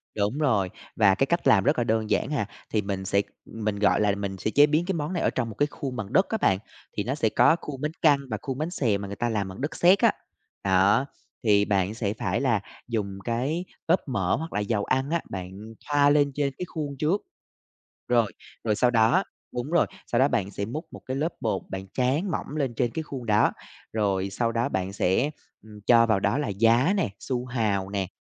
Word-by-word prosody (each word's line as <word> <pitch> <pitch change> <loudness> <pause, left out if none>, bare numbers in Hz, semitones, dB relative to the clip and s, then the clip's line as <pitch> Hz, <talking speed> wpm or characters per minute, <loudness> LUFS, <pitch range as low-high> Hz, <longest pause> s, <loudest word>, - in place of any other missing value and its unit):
đúng 105 +5 0
rồi, 110 -11 +2 0.3
và 100 -3 +5
cái 135 - +2
cách 170 +1 0
làm 95 - +5
rất 145 +2 +2
là 120 - +2
đơn 110 -1 0
giản - - +1
à, 105 -9 0 0.2
thì 110 - +1
mình 95 -1 -4
sẽ 100 +2 +2 0.2
mình, 110 -2 -3
gọi 105 - +3
là, 105 -1 +2
mình 100 -1 -4
sẽ 100 +4 -2
chế 145 +4 +6
biến 155 +3 +1
cái 195 - -1
món 160 +1 -3
này 175 - -1
ở - - +3
trong 120 -3 -2
một 110 - -8
cái 145 +4 +2
khuôn 135 -4 -6
bằng 105 -4 -5
đất 190 - +4
á 220 - 0
bạn, 95 - +2 0.4
thì 105 - +1
nó 130 +4 -2
sẽ 115 -7 +1
có 125 +8 +5
khuôn 135 -3 -7
bánh 150 - -1
căn 145 -3 +5
và 110 - -1
khuôn 135 -2 -4
bánh 155 +3 -2
xèo 110 - +1
mà 100 - -5
người 100 - -6
ta 120 - 0
làm 105 -3 -1
bằng 95 - -9
đất 150 +3 -3
sét 180 +4 +5
á. - - +5 0.5
Đó, 100 +7 +4 0.4
thì 105 -2 +4
bạn 100 0 +1
sẽ 105 -3 -2
phải - - 0
là 120 -7 +2 0.3
dùng 100 -4 -3
cái 135 +10 -1 0.2
lớp 175 +3 +3
mỡ 95 -9 +1
hoặc 160 +3 -5
là - - 0
dầu 105 0 0
ăn 130 +2 0
á, 170 - +1
bạn 95 -1 -5 0.4
thoa 145 -1 +4
lên 145 -1 +3
trên 140 -2 0
cái 180 - -3
khuôn 145 -5 -5
trước. 165 +8 +1 0.9
Rồi, 120 -3 +2 0.3
rồi 105 -2 +1
sau 125 +3 +3
đó 120 - +4 0.3
đúng 125 +4 -3
rồi, 170 0 +3 0.2
sau 120 - 0
đó 135 +3 +5
bạn 100 -7 -1
sẽ 100 +1 -4
múc 135 +10 -5
một - - -9
cái 130 +1 -3
lớp 155 +4 -1
bột 105 -4 -1
bạn 95 0 -5
tráng 140 +9 +1
mỏng 155 - -4
lên 135 -5 -1
trên 120 +1 0
cái 160 - -3
khuôn 135 -5 -7
đó, 105 -1 +3 0.4
rồi 100 -3 0
sau 115 +3 -1
đó 115 +1 0
bạn 95 0 -2
sẽ, 100 +9 +1 0.3
ừm, 105 -1 -13
cho 115 -1 +6
vào 110 -4 +2
đó 100 +7 +1
là 150 - -1
giá 115 - +3
nè, 185 - +1
su 125 -2 -2
hào 105 -6 -1
nè, 100 -2 -1
115 Hz, 240 wpm, -26 LUFS, 100-145 Hz, 0.9 s, chế